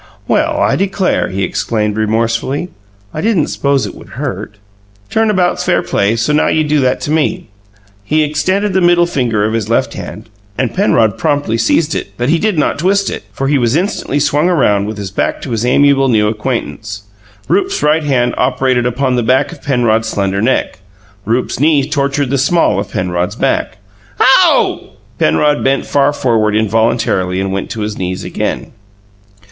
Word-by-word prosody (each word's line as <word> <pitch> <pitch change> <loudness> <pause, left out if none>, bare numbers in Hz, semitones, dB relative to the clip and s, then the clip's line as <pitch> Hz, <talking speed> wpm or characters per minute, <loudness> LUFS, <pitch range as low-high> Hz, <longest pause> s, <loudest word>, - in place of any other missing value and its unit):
"Well, - - +1
I - - +2
declare!" 195 -1 0
he 95 +1 -2
exclaimed 105 +1 -1
remorsefully. 115 +8 -1 0.4
"I 155 - -4
didn't 205 -7 +1
s'pose 140 -1 0
it - - -6
would - - -14
hurt. 105 - -5 0.6
Turn 220 0 +2
about's 185 -4 +1
fair - - +1
play; 100 +3 0
so 115 +6 0
now 150 - +2
you 155 - +2
do 150 0 +1
that 130 -2 +1
to 145 - -3
me." 165 +3 -1 0.5
He 155 +8 +1
extended 185 +7 0
the 190 - +2
middle 175 0 +4
finger 120 -10 0
of 110 - -1
his 110 -2 -2
left 115 - 0
hand - - -8 0.3
and 130 -3 -1
Penrod 115 - +2
promptly 145 -6 0
seized 155 +7 +1
it, - - -5
but 120 +2 -1
did 170 +4 +1
not 150 - 0
twist 195 +4 +1
it, - - -6
for 135 - -3
he 140 0 +2
was 120 +1 +1
instantly 170 -5 -1
swung 145 +3 +1
round 105 - +2
with 110 0 -5
his 100 -2 -6
back - - -1
to 130 - -6
his 115 -1 -1
amiable 140 +1 +3
new 105 -3 +3
acquaintance: 110 -2 -4 0.4
Rupe's 390 0 0
right 155 +1 +2
hand 125 -4 +1
operated 125 -1 +1
upon 125 +1 0
the - - +2
back 130 +4 +1
of - - -12
Penrod's 115 -4 +1
slender 100 -2 -1
neck; 125 -4 0 0.5
Rupe's 120 +4 -1
knee 145 -1 +3
tortured 140 -2 -1
the 140 - +1
small 145 - +2
of - - -4
Penrod's 90 -1 -2
back. - - -1 0.4
"OW!" - - +3 0.3
Penrod 145 - +2
bent 135 +1 +1
far 140 0 +2
forward 115 -7 +1
involuntarily 110 -4 +1
and 95 0 -2
went 95 0 -3
to 110 - -5
his 105 0 -4
knees 95 0 -3
again. - - -4
130 Hz, 175 wpm, -14 LUFS, 110-150 Hz, 0.6 s, middle